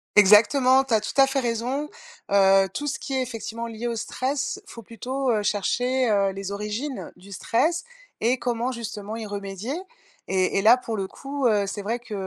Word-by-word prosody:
Exactement. 230 +6 +6
Tu 270 -3 -3
as 220 - +4
tout 215 - -5
à 270 - +6
fait 270 0 0
raison. 250 +4 -2 0.4
Heu, 195 -1 +5
tout 290 - -3
ce 285 - -2
qui 270 - -6
est, 265 - +1
effectivement, 230 -1 -5
lié 230 +1 -5
au 235 - -2
stress, 260 +4 -2
faut 230 - -10
plutôt, 255 +5 -3
heu, 215 -2 +1
chercher, 245 +5 +1
heu, 200 -2 +2
les 195 0 -6
origines 210 +7 -4
du 200 +2 -15
stress 315 - 0 0.4
et 240 +3 +2
comment 240 0 -1
justement 220 -3 -6
y 225 -1 -5
remédier. 200 +5 -5 0.5
Et 185 0 +1
et - - +3
là, 225 +5 +7
pour 230 -3 -5
le 195 -1 -2
coup, 275 +4 -2
heu, 210 -3 +2
c'est 205 +1 -4
vrai 230 +4 -2
que, 235 -2 -10
230 Hz, 195 wpm, -24 LUFS, 205-255 Hz, 0.5 s, là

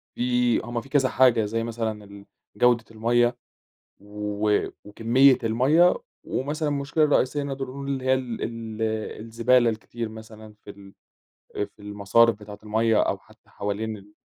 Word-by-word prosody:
في 125 -1 +2
هم 120 0 -4
في 135 - -16
كذا 135 -2 +2
حاجة 120 -4 +4
زي 115 +2 -2
مثلًا 105 -3 -5 0.3
الجودة 120 -2 +3
المَيّة 120 +2 +1 0.6
و 105 0 -1 0.2
وكمية 120 +6 +4
المَيّة، 135 +10 +4 0.3
ومثلً 150 +4 -2
ا - - 0
المشكلة 145 +2 +1
الرئيسية 145 -1 +1
نقدر 135 -1 -4
نقول 140 +2 -7
اللي 135 -2 -2
هي 130 0 +4
ال 125 -3 -4
ال 115 -1 -5 0.4
الزبالة 115 +2 +2
الكتير 115 +1 -6
مثلًا 110 -1 -12
في - - -10
ال 100 -1 -13 0.8
في - - -38
المصارف 105 +3 +3
بتاعة 105 -1 -10
المَيّة، 110 +1 +2
أو - - 0
حتى - - -24
حوالين 105 +2 -4
ال 100 +1 -17
115 Hz, 145 wpm, -25 LUFS, 105-130 Hz, 0.8 s, حاجة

